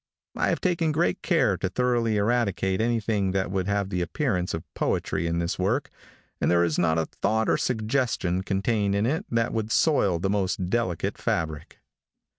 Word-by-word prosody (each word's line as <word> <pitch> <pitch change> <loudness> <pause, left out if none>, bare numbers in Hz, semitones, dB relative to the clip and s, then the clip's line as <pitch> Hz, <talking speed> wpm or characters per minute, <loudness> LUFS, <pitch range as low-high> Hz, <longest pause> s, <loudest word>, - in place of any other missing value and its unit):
I - - +1
have - - -1
taken 170 -3 +1
great 170 +4 0
care 135 - +2
to 95 - -2
thoroughly 120 0 +1
eradicate 100 -3 +1
anything 110 -4 0
that 95 -1 -1
would 95 -1 -1
have 100 -1 0
the 90 - -1
appearance 90 - -1
of 80 - -6
poetry 85 - -1
in 85 0 -1
this 85 +2 -2
work, 110 +10 0 0.5
and - - +2
there 85 0 +4
is 85 -3 0
not 80 -2 +2
a 80 - +1
thought 110 +6 -1
or - - +3
suggestion 110 -6 0
contained 100 +1 0
in 100 +2 +1
it 150 +7 -1
that 115 -1 0
would 110 -1 -2
soil 105 - +3
the 90 +4 -1
most 95 -2 -1
delicate 105 -8 -1
fabric. 80 -2 -3
100 Hz, 180 wpm, -26 LUFS, 90-115 Hz, 0.5 s, there